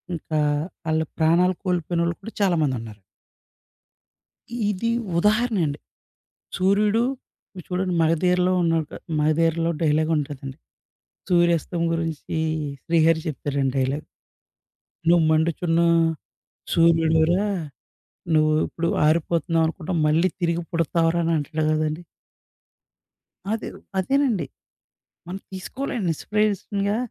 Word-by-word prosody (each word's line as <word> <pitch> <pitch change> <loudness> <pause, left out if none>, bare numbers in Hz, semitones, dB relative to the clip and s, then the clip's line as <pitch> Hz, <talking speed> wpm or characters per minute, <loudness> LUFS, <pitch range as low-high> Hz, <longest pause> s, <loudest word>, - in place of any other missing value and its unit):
ఇంకా 155 -1 -3 0.5
ఆళ్ళ 160 0 +2 0.2
ప్రాణాలు 170 +3 +4
కోల్పోయినోళ్ళు 175 -1 0
కూడా 225 +3 -9
చాలామందున్నారు. 130 - 0 1.7
ఇది 210 +4 -1 0.3
ఉదాహరణండి. 210 -7 +1 0.8
సూర్యుడు, 205 +4 +2 0.5
మీరు 180 -3 -9
చూడండి 180 0 -1
'మగధీర'లో 180 +3 +2
ఉన్న 165 -1 +2 0.4
'మగధీర'లో 165 +2 +2
డైలాగ్ 155 0 +2
ఉంటదండి. 140 -2 -6 0.7
సూర్యాస్తం 170 -1 +2
గురించి 165 -1 -3 0.5
'శ్రీహరి' 165 -1 +3
చెప్తారండి 140 -3 -2
డైలాగ్. 135 +3 -1 1.0
''నువు 170 0 +5
మండుచున్న, 165 +1 +1 0.9
సూర్యుడురా 165 +2 +3 0.9
నువ్వు 155 0 +4 0.2
ఇప్పుడు 170 0 -3 0.2
ఆరిపోతున్నావనుకుంటున్నావు. 165 +1 0
మళ్ళీ 160 +4 +3
తిరిగి 170 0 0
పుడతావురా'' 165 0 +1
అనంటడు 160 -1 -1
గదండీ. 155 +2 -1 1.5
అదేవ్ 225 - -4 0.2
అదేనండి. 230 - +1 0.8
మనం 185 +2 -5
తీసుకోవాలండి 205 +1 -3
ఇన్స్‌పిరేషన్‌గా. 205 +2 -1
165 Hz, 80 wpm, -23 LUFS, 155-185 Hz, 1.7 s, నువు